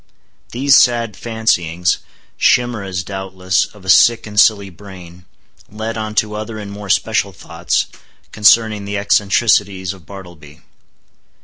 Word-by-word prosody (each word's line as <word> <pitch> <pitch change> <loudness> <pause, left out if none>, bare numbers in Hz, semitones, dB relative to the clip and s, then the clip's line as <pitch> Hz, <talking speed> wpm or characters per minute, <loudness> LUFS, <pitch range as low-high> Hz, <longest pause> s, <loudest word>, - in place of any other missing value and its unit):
These 135 +3 +3
sad 120 -3 +2
fancyings—chimeras, 100 +1 -1
doubtless, 95 -1 -2
of 105 -3 -17
a - - -6
sick 115 +4 +4
and 105 -1 -2
silly 100 -3 +3
brain—led 95 +4 -11
on 110 -1 -5
to 105 -1 0
other 110 +1 -6
and 105 -1 -8
more 100 0 -9
special - - 0
thoughts, - - -2 0.5
concerning 110 -1 +3
the 100 0 -4
eccentricities 100 -2 +1
of 90 -5 -18
Bartleby. 85 -5 -13
100 Hz, 115 wpm, -17 LUFS, 95-110 Hz, 0.5 s, sick